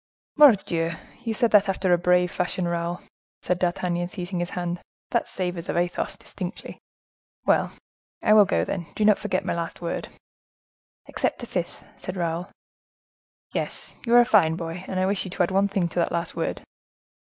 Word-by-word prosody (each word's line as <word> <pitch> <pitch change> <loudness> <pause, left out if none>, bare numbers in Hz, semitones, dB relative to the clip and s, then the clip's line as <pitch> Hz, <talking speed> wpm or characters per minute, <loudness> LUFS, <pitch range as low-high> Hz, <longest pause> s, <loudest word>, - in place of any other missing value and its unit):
"Mordioux! 190 - +5 0.3
You 225 -2 -2
said 235 0 +2
that 205 -2 +5
after 190 -1 +2
a - - +5
brave 180 0 +3
fashion, 180 -1 -1
Raoul," 170 +1 -2 0.4
said 180 0 0
D'Artagnan, 175 -1 0
seizing 180 0 -5
his 175 0 -2
hand; 175 0 -3 0.3
"that - - +1
savors 180 -2 -4
of - - 0
Athos, 175 0 -1
distinctly. - - -7 0.7
Well, - - +2 0.5
I 215 - +5
will 210 -1 +8
go, - - +1
then. 175 -4 -4
Do 215 - +1
not 210 -1 +5
forget 185 - -1
my - - 0
last 170 -1 -4
word." 170 -1 -3 1.0
"Except - - -2
a - - -3
fifth," 175 -6 -4
said 185 +1 -6
Raoul. 170 +1 -2 1.0
"Yes, - - -2
you 235 - +4
are 240 - +10
a - - +3
fine 165 -8 +4
boy! 165 +1 -5
and 185 - -2
I 185 - +2
wish 195 +1 +1
you 185 - -6
to 180 - 0
add 175 - -1
one 195 +1 +3
thing 195 -3 0
to 175 - -2
that 170 - +1
last 170 0 -2
word." - - -2
180 Hz, 185 wpm, -25 LUFS, 175-195 Hz, 1.0 s, are